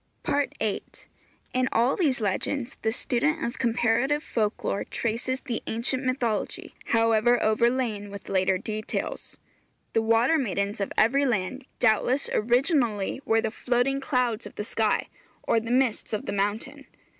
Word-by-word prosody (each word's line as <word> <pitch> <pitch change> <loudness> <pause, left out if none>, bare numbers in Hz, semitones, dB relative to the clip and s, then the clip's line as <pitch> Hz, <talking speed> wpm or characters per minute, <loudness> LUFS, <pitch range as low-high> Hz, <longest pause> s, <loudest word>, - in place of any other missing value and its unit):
VIII. 275 -7 0 0.7
In 255 0 +1
all 240 +4 +3
these 290 -9 +2
legends 235 +5 -2
the 220 - +1
student 255 +5 0
of 240 - -4
comparative 240 +5 +1
folk 215 -8 -1
lore 200 - -1
traces 240 +3 -2
the 240 -5 -3
ancient 245 +4 -1
mythology, 255 -4 -2
however 230 +1 +3
overlain 220 -2 +1
with 200 -1 -9
later 190 0 +2
details. 215 +3 -4 0.6
The 225 - +3
water 230 +8 +3
maidens 200 -4 -1
of 200 - -2
every 275 +5 +4
land 245 +4 -2
doubtless 250 +4 +2
originally 240 - +1
were 225 0 +3
the 220 - -2
floating 250 +4 0
clouds 250 -5 0
of - - -14
the - - -3
sky, 220 0 0 0.4
or 230 - +2
the 225 +1 -7
mists 250 -3 +1
of 215 - -2
the - - -3
mountain. 220 +8 -2
235 Hz, 145 wpm, -26 LUFS, 215-260 Hz, 0.7 s, every